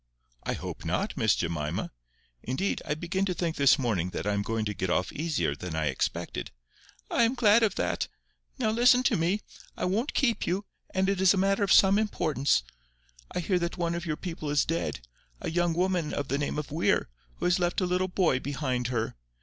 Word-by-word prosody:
"I - - -2
hope - - -6
not, - - -1
Miss - - +3
Jemima. 85 0 -2 0.5
Indeed, 130 +11 -1
I 150 - -1
begin 175 +4 -2
to 180 -2 -1
think 170 -2 -1
this 140 -2 +5
morning 105 -9 0
that - - -3
I 105 - +1
am 100 - 0
going 110 +1 -2
to 105 - -2
get 95 0 -3
off 90 +1 +1
easier 150 - -1
than 85 +1 -6
I 80 -1 0
expected." 65 - -2 0.6
"I - - +2
am 235 +2 +3
glad 230 -2 +5
of 215 -4 +2
that. - - -1 0.5
Now 225 -5 +1
listen 245 +2 +5
to - - +3
me. 175 +6 +1 0.4
I - - -1
won't 215 +10 -1
keep 235 -5 +1
you, 190 +4 -1 0.2
and 190 0 0
it 195 -1 0
is 190 +1 +6
a - - -2
matter 195 +2 +2
of 200 - +1
some 195 +1 +6
importance. 155 - +1 0.7
I - - -2
hear 180 +1 +1
that 170 +1 -3
one 170 -1 0
of 170 0 -4
your 155 -1 -1
people 165 -4 -5
is 145 0 +2
dead, 165 - -2 0.4
a - - -4
young 175 0 +1
woman 180 -3 0
of 145 - -3
the 140 - 0
name 145 - -2
of 150 -2 -4
Weir, 160 +3 +1 0.3
who - - -4
has 180 +1 +3
left 175 -1 +1
a 185 - +1
little 180 +1 +1
boy 180 -8 +2
behind 130 -3 -2
her. 115 -2 -1
170 Hz, 215 wpm, -28 LUFS, 130-190 Hz, 0.7 s, is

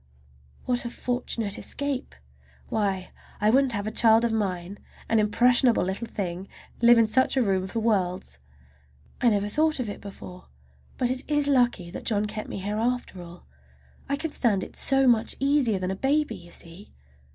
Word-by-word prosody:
What 245 -1 0
a 235 - -4
fortunate 235 -4 -3
escape! 285 -1 -3 0.5
Why, 195 -4 -1 0.3
I 210 +1 +3
wouldn't 265 0 +3
have 205 -1 -3
a 215 - -3
child 225 +1 +5
of 235 - 0
mine, 190 -3 -3 0.3
an 225 - +2
impressionable 240 +3 +3
little 190 +5 -3
thing, 185 -3 -5 0.3
live 235 0 +7
in 230 - +5
such 260 +5 +1
a - - +4
room 190 -3 0
for 225 +4 -3
worlds. 185 - -1 0.8
I 245 - +5
never 205 -2 0
thought 305 +7 +1
of 240 -4 -2
it - - -9
before, 185 -2 -10 0.5
but 250 -1 +1
it 255 0 -1
is 295 -1 +2
lucky 240 -10 +2
that - - -8
John 210 -2 +1
kept 215 0 -6
me - - -5
here 205 +2 -3
after 235 -5 -2
all. 175 0 -12 0.6
I 280 - +1
can 310 +2 -4
stand 210 -9 +1
it - - -10
so 270 -1 +2
much 235 -3 +3
easier 275 -6 +2
than 185 0 -2
a - - -2
baby, 275 +2 0
you 175 -2 -13
see. 170 +4 -10
220 Hz, 180 wpm, -26 LUFS, 195-250 Hz, 0.8 s, live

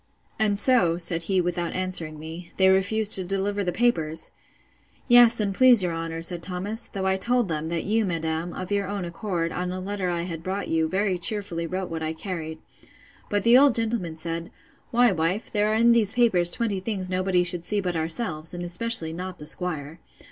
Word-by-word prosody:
And 210 -2 +2
so 200 -7 +6
(said 170 -1 +2
he, 190 -1 +2
without 175 -1 -3
answering 180 -4 -1
me,) 160 +3 -10
they 190 0 +4
refused 200 +3 +1
to 190 - +4
deliver 195 +2 -2
the 180 - -2
papers? 165 -8 -1 0.8
Yes, 240 -2 +6
and 200 -2 0
please 245 -2 +6
your 175 -2 -2
honour, 165 0 -5
said 170 0 +1
Thomas, 200 +6 0
though 195 -1 -5
I 190 0 +1
told 240 +1 0
them, 160 0 -3
that 170 -1 -3
you, 220 +2 0
madam, 165 -2 -3
of 185 +2 -7
your 200 -1 -1
own 200 -2 -4
accord, 170 -1 -4
on 180 +1 -4
a 185 - -5
letter 190 -1 -4
I 170 -1 -2
had 165 -2 -6
brought 190 +3 -4
you, 160 0 0
very 190 0 -1
cheerfully 175 -4 0
wrote 185 +1 -5
what 165 -1 -5
I 160 0 -3
carried: 160 -2 -6 0.7
But 205 -1 -1
the 235 +2 +6
old 280 -3 +4
gentleman 225 -8 -1
said, 165 +1 -4 0.4
Why, 240 -1 +3
wife, 180 +4 -2
there 210 -1 +1
are - - +1
in 235 +1 +4
these 225 -2 +2
papers 205 -8 +2
twenty 210 0 -1
things 190 -1 -4
nobody 185 -1 0
should 175 -1 +2
see 210 +3 0
but 180 -3 -3
ourselves, 160 0 -1
and 175 - -6
especially 175 -2 +1
not 180 +1 -7
the 150 - -9
'squire. 160 -1 -1
185 Hz, 200 wpm, -24 LUFS, 165-205 Hz, 0.8 s, so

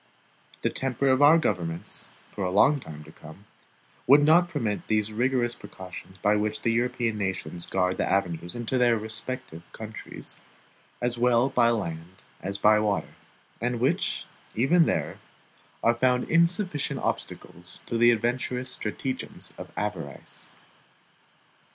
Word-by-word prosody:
The - - +1
temper 135 +1 0
of 130 +1 +3
our 150 +3 +8
governments, 85 - -1 0.2
for 100 - -4
a 90 - 0
long 135 +10 +4
time 75 - -9
to 75 - -14
come, 80 +6 -14 0.6
would 145 +3 +7
not 170 +4 +5
permit 115 -10 -2
those 110 -1 +1
rigorous 120 +1 +1
precautions 95 -1 -10
by 105 +3 +2
which 105 0 -2
the 115 - +2
European 120 -2 0
nations 95 -4 -2
guard 90 -1 0
the - - 0
avenues 90 -2 0
into 120 +2 -1
their 120 -2 +4
respective 110 -3 -4
countries, 110 0 -7 0.6
as 120 -1 0
well 120 +1 +4
by 120 -3 +4
land 90 -5 -4 0.2
as 100 +2 -3
by 105 +1 +5
water; 105 -2 -1 0.5
and 120 0 -1
which, 125 - 0 0.3
even 160 +9 +4
there, - - -1 0.6
are 115 - +5
found 125 +1 +1
insufficient 170 -1 +2
obstacles 85 +1 -4
to - - -4
the 120 +1 +6
adventurous 125 +2 0
stratagems 130 +4 -4
of - - -9
avarice. 90 -8 -5
115 Hz, 140 wpm, -27 LUFS, 95-130 Hz, 0.6 s, our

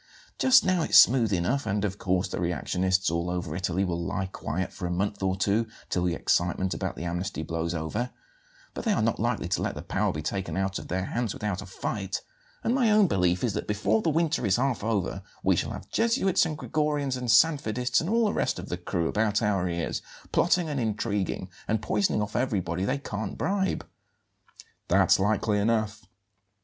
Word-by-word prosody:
Just 260 0 +6
now 185 -2 +2
it's - - +4
smooth 120 -4 +6
enough 95 +10 0
and, 105 +1 0
of 100 0 -4
course, 95 0 +1
the - - -4
reactionists 90 +2 0
all 85 +1 -1
over 90 -3 -3
Italy 90 +1 0
will 85 -1 -2
lie 95 +1 -2
quiet 95 -1 -4
for 90 - -4
a - - -3
month 100 +3 -1
or 95 -1 +1
two 100 +4 +1 0.2
till 90 -1 +1
the 85 -1 +1
excitement 90 +2 +1
about - - -3
the 80 - -6
amnesty 85 -1 -3
blows 85 +2 -2
over; 95 +10 -2 0.6
but - - -5
they 225 - +2
are - - +1
not 115 - 0
likely 120 -4 0
to 90 - 0
let - - -2
the - - -6
power - - 0
be 75 +1 -5
taken 95 -1 -3
out 95 0 -1
of - - -9
their 95 +1 -2
hands 115 -1 -2
without 105 -3 -3
a 100 - -9
fight, 95 +1 -4 0.4
and 235 - +1
my 250 -4 +3
own 210 -1 +6
belief 90 - +1
is 120 -5 +1
that - - -3
before 105 +1 +1
the - - +1
winter 160 -1 +1
is 100 -3 +3
half 125 -3 0
over 100 -3 -1 0.2
we - - +4
shall - - -1
have - - -7
Jesuits 225 -6 +2
and 155 -2 -4
Gregorians 150 -4 -1
and 125 -1 -4
Sanfedists 125 -5 +3
and 165 - -3
all 230 +1 +3
the 210 - +1
rest - - 0
of 90 +2 -7
the 90 - -2
crew 85 -1 -2
about 110 0 +1
our 95 -4 +1
ears, 85 -1 -2 0.3
plotting 175 -1 +3
and 145 -3 -2
intriguing, 105 -4 -1 0.2
and 110 - +1
poisoning 105 0 +1
off 105 - -6
everybody 95 -7 0
they 105 - 0
can't 110 -6 -5
bribe." 195 -1 0 1.0
"That's - - +4
likely 105 +1 +1
enough." 110 -3 0
100 Hz, 205 wpm, -27 LUFS, 90-125 Hz, 1.0 s, Just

